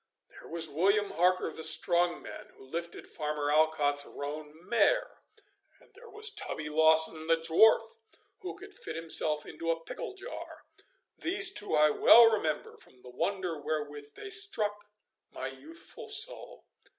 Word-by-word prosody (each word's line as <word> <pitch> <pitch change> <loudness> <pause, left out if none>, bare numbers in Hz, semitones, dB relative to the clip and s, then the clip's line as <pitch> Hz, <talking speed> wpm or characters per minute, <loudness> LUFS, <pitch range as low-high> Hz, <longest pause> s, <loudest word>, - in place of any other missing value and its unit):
There - - -15
was 165 0 -1
William 200 +7 +1
Harker 180 +2 +1
the - - -9
strong 170 +2 +2
man, - - -10
who - - -15
lifted 170 +5 -6
Farmer 150 -1 -3
Alcott's 150 -2 +2
roan 150 +1 -7 0.2
mare; - - +1 0.6
and - - -25
there 480 -1 -15
was 435 +1 -1
Tubby 150 -1 -5
Lawson 160 +1 +5
the 165 0 +3
dwarf, 220 +8 +3 0.4
who 380 -3 -8
could 405 +1 -13
fit - - -6
himself 160 -2 +1
into 165 - -6
a 165 0 0
pickle 165 - -8
jar 395 +6 -10 0.5
these 390 +2 +2
two 205 - -2
I 150 0 +4
well 235 +9 +7
remember 205 -9 -1
from 125 - -21
the 125 - -12
wonder 180 +3 -3
wherewith 145 -1 -5
they 400 - -9
struck 215 - +1 0.4
my - - -6
youthful 330 +1 -11
soul. - - -3
165 Hz, 150 wpm, -29 LUFS, 150-225 Hz, 0.6 s, well